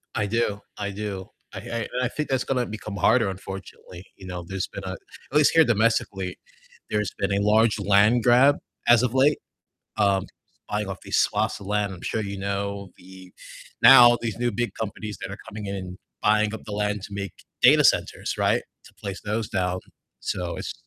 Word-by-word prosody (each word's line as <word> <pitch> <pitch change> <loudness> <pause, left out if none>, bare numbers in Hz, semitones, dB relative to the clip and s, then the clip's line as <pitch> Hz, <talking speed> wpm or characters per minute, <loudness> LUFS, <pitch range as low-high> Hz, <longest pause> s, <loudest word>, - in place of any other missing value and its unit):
I 105 - 0
do, 105 -1 0 0.2
I 100 -1 -3
do, 100 -2 -5 0.3
I - - -5
I - - -10
and 115 +2 -3
I - - +2
think 150 +1 -4
that's 130 -1 +1
gonna 125 -2 0
become 105 -1 -7
harder, 105 +2 +3
unfortunately, 95 -1 -9
you 95 - -13
know, 90 -1 -5
there's 95 -1 -3
been 100 - -8
a 95 - -4
At 140 - -6
least 150 - +5
here 165 -1 +7
domestically, 105 -5 0 0.5
there's 105 -1 -1
been 100 - 0
a 100 - +1
large 110 +1 +3
land 105 +4 +4
grab 130 +4 +5 0.3
as 120 0 +6
of 125 -1 0
late, 140 +3 +3 0.6
um, 100 -2 +2 0.4
buying 105 -1 -2
off 95 - -6
these - - 0
swaths - - +1
of 100 - -10
land, 105 -1 0
I'm 85 - -13
sure 110 - -2
you 100 -1 -5
know 100 0 -3
the 95 0 -14 0.5
Now 120 -2 +9
these 115 -2 -3
new 120 0 +1
big 120 -4 -2
companies 105 0 -5
that - - -5
are - - -7
coming 105 0 -7
in 100 0 -3
and 90 0 -7 0.2
buying 105 0 +3
up 110 - -8
the 105 - -8
land 105 -1 -1
to - - -7
make 100 -2 -4 0.3
data - - +7
centers, - - +1
right, - - +2 0.2
to - - -17
place 100 -1 -5
those 105 +1 -2
down, 90 -1 -1 0.4
so - - -3
it's - - -5
105 Hz, 200 wpm, -25 LUFS, 95-115 Hz, 0.6 s, Now